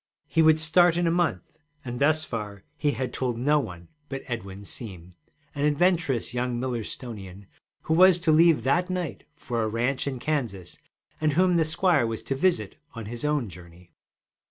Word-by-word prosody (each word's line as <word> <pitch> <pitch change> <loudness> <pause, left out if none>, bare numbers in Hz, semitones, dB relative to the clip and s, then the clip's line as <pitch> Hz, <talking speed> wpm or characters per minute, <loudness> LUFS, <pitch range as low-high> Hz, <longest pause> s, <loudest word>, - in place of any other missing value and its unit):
He 165 - +2
would 160 0 +5
start 170 +1 +4
in 175 - +1
a 165 - +2
month, 160 - -1 0.3
and 120 -1 -5
thus 155 +2 +3
far 105 -3 -6
he 145 -2 0
had 130 -1 -3
told 125 -3 -2
no 145 +5 +3
one 85 -9 -7 0.2
but 135 0 -5
Edwin 100 -5 -6
Seem, 90 -6 -7 0.4
an 145 - -3
adventurous 150 -6 +1
young 125 -1 -1
Millerstonian 110 -5 -5 0.4
who 160 - 0
was 185 +1 +7
to 165 -2 +3
leave 160 -5 +5
that 175 +8 +1
night 180 -4 -4
for 120 -6 -3
a 110 - 0
ranch 120 +6 -1
in 135 -2 -2
Kansas, 120 - -3 0.4
and 155 -1 +2
whom 180 +2 +3
the 165 -2 +3
squire 155 -5 +2
was 115 -1 -4
to - - -2
visit 175 +6 0 0.2
on 115 -2 -6
his 120 +4 -7
own 150 -5 0
journey. 85 -1 -14
135 Hz, 180 wpm, -26 LUFS, 115-160 Hz, 0.4 s, was